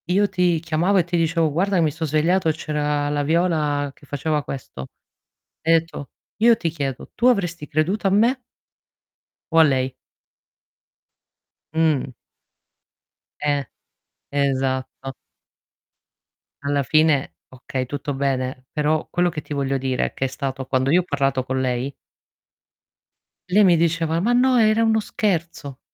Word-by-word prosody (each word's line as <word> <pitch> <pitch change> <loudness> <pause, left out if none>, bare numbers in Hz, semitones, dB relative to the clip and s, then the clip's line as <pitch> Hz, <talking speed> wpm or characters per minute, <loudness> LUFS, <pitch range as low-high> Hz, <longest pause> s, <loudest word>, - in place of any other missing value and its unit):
Io 200 +3 +3
ti 180 -3 +1
chiamavo 165 +5 +1
e 180 - +4
ti 175 +1 -3
dicevo: 165 -1 +1
"Guarda 185 +4 +1
mi 160 -2 +2
so' 160 +2 -4
svegliato 160 +4 +2
e - - +2
c'era 150 -1 -2
la 145 0 0
Viola 150 -3 +1
che 145 - -20
faceva 150 +1 -1
questo". 125 - -7 0.7
Hai 165 +1 +3
etto: 165 -4 -2 0.3
"Io 230 +1 +5
ti 170 -5 -2
chiedo: 140 -5 -5
'tu 245 - +1
avresti 175 -10 +1
creduto 170 +7 0
a - - +3
me'" 235 +7 +3 1.1
'o 165 - +4
a - - +9
lei?' 130 -3 +1 1.8
Mh. 160 -5 +1 1.3
Eh, 145 -2 0 0.7
esatto. 135 -1 -1 1.5
Alla 140 0 0
fine 155 +1 +2
okay, 130 0 -5
tutto 145 +2 -4
bene, 130 -1 -2
però 155 +1 0
quello 175 0 +1
che 155 -3 -5
ti - - -20
voglio 135 -1 -1
dire 130 -1 -1
è - - -5
che 135 - -2
è - - +1
stato 135 0 -4
quando 130 +1 +1
io 180 +3 +5
ho - - -9
parlato 135 -5 0
con 130 +1 -2
lei 130 +1 -1 1.6
lei 205 +4 +5
mi 180 -3 +5
diceva: 165 0 +1
"Ma 230 +7 +1
no, 255 +1 +4
era 220 0 +4
uno 220 -1 +3
scherzo". 170 -10 -3
155 Hz, 145 wpm, -22 LUFS, 140-175 Hz, 1.8 s, a